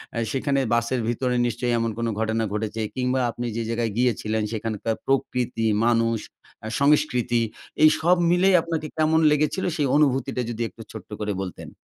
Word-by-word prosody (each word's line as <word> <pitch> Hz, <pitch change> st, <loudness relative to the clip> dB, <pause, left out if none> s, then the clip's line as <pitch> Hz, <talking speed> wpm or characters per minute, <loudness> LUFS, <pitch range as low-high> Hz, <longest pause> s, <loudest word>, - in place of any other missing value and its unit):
আ -, -, -3 dB
সেখানে 140 Hz, +1 st, 0 dB
বাসের 120 Hz, +1 st, +1 dB
ভিতরে 125 Hz, +1 st, -1 dB
নিশ্চয়ই 120 Hz, +1 st, -1 dB
এমন 115 Hz, 0 st, 0 dB
কোন 115 Hz, 0 st, -1 dB
ঘটনা 110 Hz, 0 st, 0 dB
ঘটেছে। 110 Hz, +1 st, -3 dB
কিংবা 130 Hz, 0 st, 0 dB
আপনি 120 Hz, -, -5 dB
যে 115 Hz, -, -1 dB
জায়গায় 115 Hz, -1 st, -1 dB
গিয়েছিলেন 110 Hz, -3 st, 0 dB
সেখানকার 110 Hz, 0 st, -2 dB
প্রকৃতি, 125 Hz, -3 st, 0 dB, 0.2 s
মানুষ, 115 Hz, -1 st, +2 dB, 0.5 s
আ -, -, -3 dB
সংস্কৃতি 140 Hz, -5 st, +2 dB, 0.4 s
এই 155 Hz, -, +9 dB
সব 175 Hz, +3 st, +4 dB, 0.2 s
মিলিয়ে 180 Hz, +1 st, +5 dB
আপনাকে 160 Hz, -2 st, -3 dB
কেমন 155 Hz, +1 st, +3 dB
লেগেছিল? 150 Hz, +5 st, +1 dB
সেই 145 Hz, -3 st, +1 dB
অনুভূতিটা 135 Hz, -3 st, +2 dB
যদি 120 Hz, 0 st, -5 dB
একটু -, -, -14 dB
ছোট্ট -, -, -10 dB
করে 105 Hz, -1 st, -2 dB
বলতেন। 95 Hz, -2 st, -7 dB
120 Hz, 160 wpm, -24 LUFS, 115-145 Hz, 0.5 s, এই